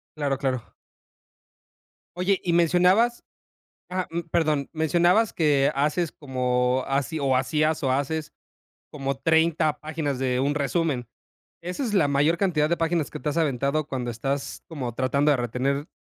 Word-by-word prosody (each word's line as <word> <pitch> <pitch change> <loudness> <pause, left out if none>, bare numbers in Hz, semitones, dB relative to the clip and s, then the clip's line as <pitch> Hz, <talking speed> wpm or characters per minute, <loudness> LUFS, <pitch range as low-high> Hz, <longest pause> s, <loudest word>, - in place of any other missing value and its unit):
Claro, 140 -3 -1
claro. 130 -4 -3 1.4
Oye, 185 +2 +1
y 170 - 0
mencionabas 180 +8 +3 0.6
ajá, 185 0 -3
mm, 170 - -2
perdón, 155 -4 +1
mencionabas 175 +7 +3
que 145 -4 +2
haces 150 +4 0
como, 125 -2 0
haci 140 +2 -1
o, 135 -2 +2
hacías, 155 +3 +1
o 130 - +2
haces 150 +3 -2 0.6
como 135 -2 -3
30 160 0 +2
páginas 155 -4 -3
de 130 -1 0
un 145 +2 +1
resumen, 145 -3 -1 0.6
¿esa 180 +10 -4
es 220 -4 -2
la 160 -8 +3
mayor 145 +4 +2
cantidad 160 -6 +1
de 170 - +1
páginas 165 -2 0
que - - -7
te 150 - -1
has 155 - -3
aventado 140 0 0
cuando 125 -4 -3
estás 135 +4 -4
como 130 -8 -5
tratando 140 +4 +2
de 140 - +3
retener 130 +5 -1
150 Hz, 150 wpm, -25 LUFS, 135-165 Hz, 1.4 s, mencionabas